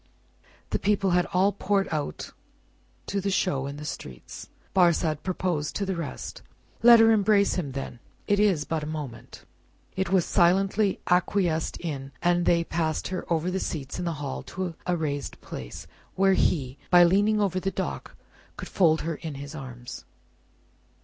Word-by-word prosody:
The - - 0
people 200 -2 +1
had 175 0 +2
all 190 +3 +2
poured 200 0 0
out 150 -2 -3 0.7
to 200 - -2
the 200 - -1
show 140 -8 0
in 140 +1 -6
the 150 - -7
streets. 65 - -8 0.2
Barsad 170 -4 +3
proposed 175 -5 -2
to 200 - -1
the 190 -1 -2
rest, 165 -3 -6 0.4
"Let 235 0 +9
her 225 0 +6
embrace 205 -2 +3
him 145 -8 -3
then; 135 -3 -6 0.3
it 205 0 +2
is 195 -8 +3
but 160 -1 -2
a 150 - -5
moment." 150 -6 -7 0.5
It 190 -2 -1
was 185 -2 +3
silently 195 +3 +2
acquiesced 180 -2 +1
in, 135 -5 -5
and 175 0 +2
they 170 -1 +4
passed 160 -2 -2
her 185 -1 -5
over 170 +2 +1
the 190 - -1
seats 140 -5 -4
in 180 - -3
the 170 - -1
hall 140 -2 -4
to 185 -3 -5
a 180 -1 +1
raised 145 -3 -3
place, - - -8 0.3
where 195 0 +4
he, 135 -7 0
by 175 -1 +7
leaning 205 +5 +3
over 190 -3 +1
the 195 - -1
dock, 190 0 -5 0.4
could - - -7
fold 160 -4 +3
her 165 -1 -3
in 155 -3 -6
his 140 +2 -8
arms. 125 -5 -8
175 Hz, 170 wpm, -26 LUFS, 150-195 Hz, 0.7 s, Let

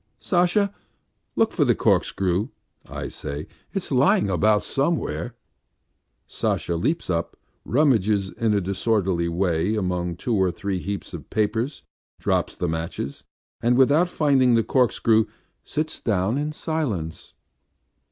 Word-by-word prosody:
"Sasha, 190 +3 +2 0.6
look - - +3
for - - +2
the - - +3
corkscrew... 95 +3 +1 0.2
." - - -41 0.2
I - - -3
say. 70 +1 -6 0.3
"It's - - -3
lying 100 - +3
about 105 +4 +3
somewhere." 135 -4 -1 0.9
Sasha 85 - -1
leaps 155 - -1
up, 85 -2 -2 0.3
rummages 110 -8 +2
in 110 -2 0
a 100 - +2
disorderly 95 -2 0
way 90 +3 0
among 90 -4 -1
two 120 +7 -2
or 95 -2 +3
three 95 +1 -3
heaps 100 +2 -5
of - - -8
papers, 110 +6 -1 0.4
drops - - 0
the 90 - -2
matches, 80 -3 -4 0.4
and 120 +1 +3
without 145 +7 +4
finding 135 -7 +3
the 115 - +3
corkscrew, 115 -3 +3 0.4
sits 155 +1 -3
down 100 +1 0
in 150 +2 -1
silence. 120 - -3
105 Hz, 130 wpm, -24 LUFS, 90-130 Hz, 0.9 s, without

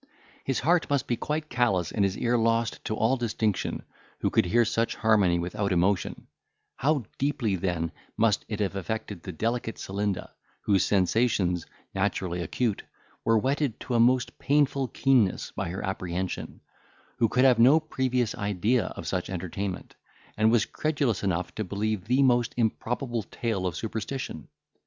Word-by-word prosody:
His 135 - -1
heart 170 +4 +2
must 140 -2 +1
be 120 - 0
quite 150 +5 -3
callous, 120 - +1
and 105 - +1
his 95 0 0
ear 120 0 +1
lost 115 0 +1
to 110 - -1
all 115 +5 +2
distinction, 110 -3 -1 0.3
who - - -1
could - - +3
hear 120 +6 +4
such 115 +2 0
harmony 105 -6 +3
without 90 +4 -2
emotion; 90 +2 +1 0.5
how 145 -1 +1 0.2
deeply, 135 -7 0
then, 85 -3 -1 0.3
must 110 -2 +3
it 105 -1 -3
have 100 -1 -1
affected 100 0 -4
the 95 - -6
delicate 115 +5 -2
Celinda, 100 0 -3 0.3
whose 95 -2 +3
sensations, 95 -2 +1 0.3
naturally 95 -3 -1
acute, 105 +5 -1 0.4
were 115 0 +4
whetted 135 +2 0
to 125 - -4
a 120 - +3
most 125 +1 +3
painful 140 -1 +2
keenness 125 -4 +2
by - - -3
her 95 +3 -4
apprehension; 95 -1 -4 0.6
who 115 - +3
could 125 +4 +3
have 125 -3 +5
no 135 +7 +7
previous 130 -6 -1
idea 105 +3 +1
of 85 - -7
such 90 +1 -2
entertainment, 95 +1 -4 0.4
and 110 +1 +3
was 120 -3 +3
credulous 145 -8 -1
enough 90 -3 -1
to 110 - -3
believe 105 0 -2
the 130 +5 +3
most 120 -3 +2
improbable 120 +1 -1
tale 100 -1 -2
of 85 - -3
superstition! 110 - -4
110 Hz, 155 wpm, -27 LUFS, 95-125 Hz, 0.6 s, no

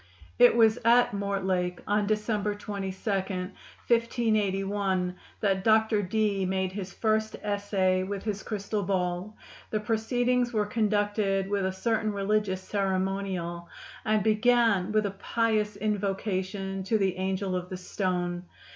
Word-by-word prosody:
It 245 -1 +7
was 225 0 +5
at 235 -1 +5
Mortlake, 190 -3 -1
on 205 0 +1
December 210 -1 0
22, 200 -2 -5 0.2
1581, 195 -1 -1 0.3
that 195 -2 +1
Dr. 220 -1 +4
Dee 205 0 0
made 190 0 0
his 190 -1 -6
first 220 +2 0
essay 200 -2 +1
with 195 +1 -4
his 210 -1 -3
crystal 210 0 -3
ball. 180 +1 -2 0.3
The 215 - 0
proceedings 240 +3 0
were 210 -1 +1
conducted 205 -2 +1
with 200 -2 +1
a - - -1
certain 215 +2 0
religious 200 -1 0
ceremonial, 190 -3 -2 0.3
and 215 -2 +2
began 220 -3 +3
with 215 0 +2
a 200 - -1
pious 215 +1 0
invocation 195 -2 -2
to 220 +3 +2
the 190 -3 0
angel 190 0 -1
of 180 0 -4
the 185 - -5
stone. 180 -1 -2
200 Hz, 130 wpm, -28 LUFS, 190-215 Hz, 0.3 s, It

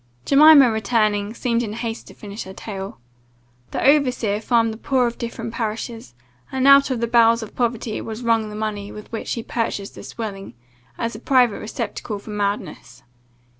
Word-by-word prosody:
Jemima 285 -3 +7
returning, 215 -2 +1
seemed 235 -1 0
in 215 -3 -4
haste 230 0 -5
to - - -13
finish 205 +1 -8
her 190 - -9
tale. 195 - -7 0.7
"The - - -2
overseer 250 -8 +2
farmed 230 -1 +2
the 220 - -11
poor 260 -1 +1
of 235 0 -3
different 230 -1 -5
parishes, 225 - -5 0.4
and 265 0 +1
out 275 0 +7
of 250 -3 -2
the 235 - +1
bowels 230 0 +4
of 215 - -11
poverty 235 -2 -1
was 220 +2 -6
wrung 225 -2 +1
the 210 - -8
money 210 -1 -4
with 210 - -11
which 225 - -5
he 230 - -4
purchased 225 -4 -3
this - - -10
dwelling, 195 - -6 0.4
as 230 0 -2
a 215 - -8
private 250 -3 +3
receptacle 215 -1 -5
for 200 +2 -10
madness. 200 -11 -4
225 Hz, 175 wpm, -22 LUFS, 210-240 Hz, 0.7 s, Jemima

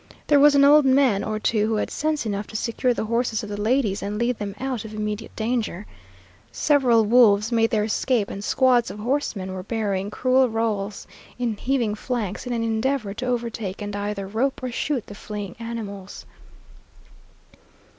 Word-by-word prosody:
There 290 -1 +4
was 290 0 +6
an 280 - +6
old 295 +1 +7
man 260 -6 +3
or 215 0 -2
two 215 -1 +1
who 220 - 0
had 210 - -2
sense 305 -3 -1
enough 205 -1 -3
to - - -12
secure 240 +3 0
the 235 - -2
horses 230 0 0
of 210 - -7
the 205 0 -4
ladies 215 -3 +1
and 205 +1 -3
lead 235 +1 0
them 200 -1 -4
out 260 -4 -3
of 215 -1 -8
immediate 210 +1 -4
danger. 220 -4 -2 0.7
Several 250 -7 +3
wolves 220 -1 +5
made 225 -1 +3
their 215 -2 +1
escape, 220 0 0
and 200 - -6
squads 250 0 +3
of - - -8
horsemen 210 -5 -2
were 185 - -5
burying 200 -2 -2
cruel 255 +3 +2
rowels 215 -3 -2 0.3
in 240 -3 -1
heaving 240 -2 0
flanks 220 0 -4
in - - -3
an 230 -1 -1
endeavor 225 -1 -1
to 250 +5 -5
overtake 230 -5 -3
and 205 -1 -5
either 205 -1 -3
rope 250 +7 -1
or 255 - -2
shoot 260 0 -2
the - - -10
fleeing 205 -2 -7
animals. 210 -4 -7
225 Hz, 180 wpm, -23 LUFS, 205-250 Hz, 0.7 s, old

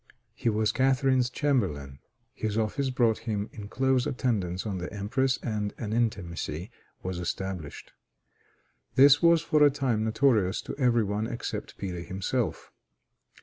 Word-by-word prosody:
He 115 - -1
was 110 0 +1
Catharine's 130 -1 +2
chamberlain. 90 - -1 0.3
His 110 -3 -3
office 130 +5 0
brought 120 -3 +2
him 105 -1 -2
in 105 -1 -8
close 130 +2 +1
attendance 100 -9 -1
on 100 -4 -3
the 90 - -5
empress, 120 +6 0
and 105 -3 -2
an 110 -2 -4
intimacy 90 -6 -2 0.3
was 90 -1 -3
established. 90 -3 -5 1.0
This 140 +2 +7
was 170 -1 +5
for 155 -3 +2
a 145 - +8
time 130 -6 0
notorious 110 -4 +2
to - - -6
every 120 -3 +3
one 105 +2 -2
except 120 - -5
Peter 90 -3 -4
himself. 95 +2 -3
110 Hz, 140 wpm, -28 LUFS, 95-130 Hz, 1.0 s, a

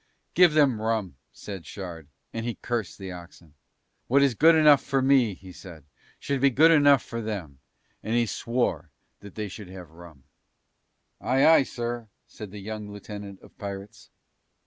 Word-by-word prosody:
"Give 175 -2 +5
them 140 -8 +3
rum," 110 -9 -2
said 95 -5 -9
Shard, 85 -6 -8 0.3
and 115 - -4
he 120 0 -3
cursed 115 -5 -4
the 95 -2 -7
oxen. 85 -3 -13 0.5
"What 140 +3 +4
is 135 -3 +3
good 160 +8 +5
enough 150 -3 +6
for 135 -1 0
me," 130 -6 +3
he 95 0 -13
said, 85 -2 -12 0.3
"should 140 -2 -3
be 140 - +5
good 155 +6 +5
enough 145 -4 +5
for 115 0 -5
them," 95 -11 -6 0.4
and 110 - -2
he 120 0 +3
swore 120 +2 -2 0.3
that 100 -1 -13
they 105 -1 -4
should 100 0 -10
have 90 -4 -11
rum. 80 -5 -15 1.0
"Aye, 135 +2 +2
aye, 160 -1 +7
sir," 120 -3 -5 0.2
said 105 - -10
the 105 - -10
young 105 +1 -7
lieutenant 100 -1 -9
of - - -18
pirates. 100 0 -8
110 Hz, 170 wpm, -26 LUFS, 95-130 Hz, 1.0 s, aye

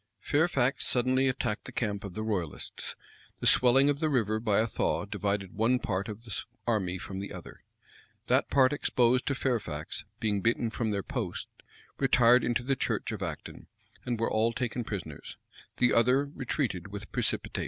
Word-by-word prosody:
Fairfax 140 -4 +1
suddenly 130 +2 +2
attacked 125 -4 -1
the - - -8
camp 105 -4 -2
of 100 -3 -7
the 110 - -3
royalists. 95 -8 -4 0.4
The - - -4
swelling 130 +3 +6
of 145 -1 +2
the 155 -1 +1
river 110 -6 +1
by 110 -3 +1
a 110 - +3
thaw 115 - -1
divided 100 -2 -2
one 115 +4 +2
part 100 -3 -2
of 105 +2 -7
the 110 -5 -3 0.2
army 95 -6 0
from 95 +1 -6
the 100 - -6
other. - - -10 0.6
That - - +2
part 135 0 +4
exposed 125 -3 +2
to 140 - +1
Fairfax, 115 - -2 0.2
being 105 -4 0
beaten 115 +1 +1
from 115 -1 -1
their 100 -2 -1
post, 120 -11 -4 0.5
retired 125 -2 +5
into 120 0 0
the 135 +2 +1
church - - -1
of - - -5
Acton, - - -6 0.4
and 120 -2 -2
were 115 - 0
all 115 +2 +2
taken 120 0 -2
prisoners; 90 -9 -6 0.4
the 125 - +4
other 125 +4 +4
retreated 125 - -3
with 100 +1 -8
precipitation. - - -1
115 Hz, 175 wpm, -29 LUFS, 105-130 Hz, 0.6 s, swelling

